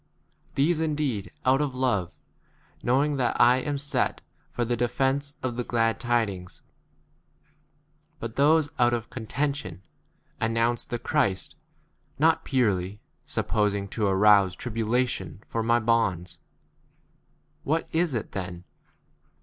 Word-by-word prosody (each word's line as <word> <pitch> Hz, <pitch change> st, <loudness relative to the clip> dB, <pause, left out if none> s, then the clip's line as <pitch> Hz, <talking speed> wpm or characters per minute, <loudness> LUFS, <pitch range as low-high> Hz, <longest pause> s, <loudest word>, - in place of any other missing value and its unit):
These 155 Hz, +4 st, +2 dB
indeed 145 Hz, -10 st, -1 dB, 0.2 s
out 130 Hz, +2 st, +4 dB
of 140 Hz, -3 st, -2 dB
love, 105 Hz, -9 st, 0 dB, 0.7 s
knowing 140 Hz, +4 st, +2 dB
that 125 Hz, -2 st, 0 dB
I 120 Hz, +1 st, +6 dB
am 145 Hz, +2 st, -2 dB
set 145 Hz, +1 st, 0 dB, 0.3 s
for 120 Hz, -, -2 dB
the 120 Hz, +1 st, 0 dB
de 120 Hz, +1 st, +1 dB
17 120 Hz, +1 st, -17 dB
fence 140 Hz, +2 st, 0 dB
of 125 Hz, -2 st, -2 dB
the 125 Hz, -, 0 dB
glad 115 Hz, -1 st, +1 dB
tidings; 105 Hz, -7 st, -2 dB, 1.6 s
but 115 Hz, -4 st, -6 dB
those 150 Hz, +1 st, +4 dB
out 120 Hz, 0 st, +4 dB
of 115 Hz, -1 st, -6 dB
contention, 140 Hz, -2 st, -3 dB, 0.6 s
announce 115 Hz, +1 st, +1 dB
the 120 Hz, -, -3 dB
Christ, 95 Hz, -5 st, 0 dB, 0.6 s
not 160 Hz, +3 st, +3 dB
purely, 105 Hz, -7 st, 0 dB, 0.3 s
supposing 100 Hz, -2 st, 0 dB
to 105 Hz, 0 st, -1 dB
arouse 100 Hz, -1 st, +5 dB
1 -, -, -13 dB
tribulation 115 Hz, -5 st, -1 dB
for 115 Hz, -, -2 dB
my 115 Hz, +1 st, +3 dB
18 115 Hz, -, -4 dB
bonds.™ 90 Hz, -7 st, +1 dB, 1.2 s
What 160 Hz, +3 st, 0 dB
is 165 Hz, -4 st, +1 dB
it 110 Hz, -, -3 dB
then 90 Hz, -2 st, -5 dB
120 Hz, 130 wpm, -26 LUFS, 105-135 Hz, 1.6 s, I